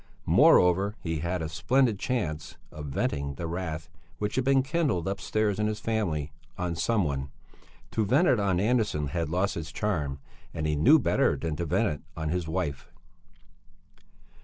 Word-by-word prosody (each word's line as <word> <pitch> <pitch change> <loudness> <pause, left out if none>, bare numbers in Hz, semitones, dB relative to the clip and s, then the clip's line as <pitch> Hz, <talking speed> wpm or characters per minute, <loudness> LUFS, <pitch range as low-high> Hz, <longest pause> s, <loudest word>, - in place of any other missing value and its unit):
Moreover 95 +4 +5
he 80 -2 -3
had 85 +3 -2
had 90 - -2
a 80 - -4
splendid 115 +5 +2
chance 85 - -3
of 75 -1 -7
venting 70 0 -2
the 85 - -5
wrath 80 -2 -4 0.3
which 105 +3 -2
had 130 - +1
been 135 0 +3
kindled 140 - 0
upstairs, 105 +1 -1
in 105 - +1
his 105 0 -2
family, 90 -10 -1 0.3
on 90 -1 -2
some 105 +5 +1
one; 70 -3 -2 0.6
to 110 - +1
vent 135 - +3
it 120 - +4
on 95 -3 +1
Andersson 105 - +1
had 85 -1 -2
lost 90 +4 0
its 85 -1 -5
charm; 75 -7 -2 0.4
and 80 - -2
he 75 -1 +1
knew 130 - +6
better 140 - +2
than 80 -2 -3
to 85 - -2
vent - - +2
it 75 - -3 0.2
on 80 -1 -2
his 90 0 -2
wife. 80 -5 -3
90 Hz, 175 wpm, -28 LUFS, 80-105 Hz, 0.6 s, knew